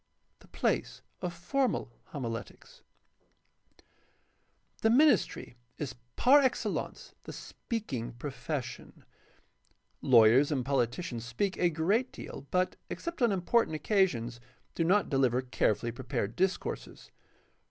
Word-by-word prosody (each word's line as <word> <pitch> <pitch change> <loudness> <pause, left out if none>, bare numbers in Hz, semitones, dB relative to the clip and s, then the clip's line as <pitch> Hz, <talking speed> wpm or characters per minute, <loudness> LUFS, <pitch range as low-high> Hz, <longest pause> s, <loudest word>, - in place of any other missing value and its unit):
The - - -19
place - - -1 0.2
of 180 - -2
formal 175 - -1
homiletics. 115 -5 -7 1.0
— - - -34
The 225 - +4
ministry 270 - +3 0.2
is 140 -4 -4 0.2
par 275 +4 +6
excellence 260 -2 -2
the - - -6
speaking 130 - -5
profession. 135 +1 -6 1.0
Lawyers 125 +4 +6
and 130 -4 0
politicians 130 -1 -1
speak 155 - -1
a 175 - +3
great 195 - +1
deal, 140 - -9
but, 180 0 0
except 340 -4 -5
on 235 -3 +4
important 195 -1 +2
occasions, 145 - +1 0.3
do 165 - 0
not 195 +5 +3
deliver 130 -3 +2
carefully 120 -2 0
prepared 120 -3 -3
discourses. 190 +1 -2
150 Hz, 110 wpm, -30 LUFS, 120-200 Hz, 1.0 s, par